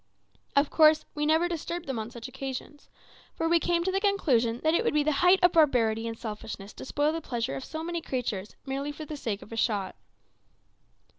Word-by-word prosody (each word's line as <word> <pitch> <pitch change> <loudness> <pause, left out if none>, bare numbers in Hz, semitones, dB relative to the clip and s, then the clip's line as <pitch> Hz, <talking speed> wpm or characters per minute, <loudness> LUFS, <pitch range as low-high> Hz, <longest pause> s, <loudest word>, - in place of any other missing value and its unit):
Of 280 +1 +3
course, 310 -1 +5
we 295 0 -1
never 320 +3 +3
disturbed 345 0 -4
them 265 -4 -3
on 220 +1 -4
such 240 +1 -8
occasions, 265 +2 -7 0.5
for 325 - -1
we 335 +1 +4
came 340 0 +1
to 380 - 0
the 390 +1 0
conclusion 250 - +2
that 315 0 +3
it - - +2
would - - 0
be 300 - +4
the 305 - +2
height 360 +2 +7
of 355 - +7
barbarity 230 -8 +3
and 225 0 -5
selfishness 210 -2 -7
to - - -9
spoil 295 +3 +1
the 330 - -3
pleasure 240 -4 -3
of 265 - -5
so 315 +3 -6
many 340 0 -3
creatures 220 -8 -3
merely 275 +2 -3
for 305 +1 -8
the 300 - -6
sake 220 -8 -4
of - - -16
a 225 - -6
shot. 205 -4 0
285 Hz, 215 wpm, -28 LUFS, 230-325 Hz, 0.5 s, height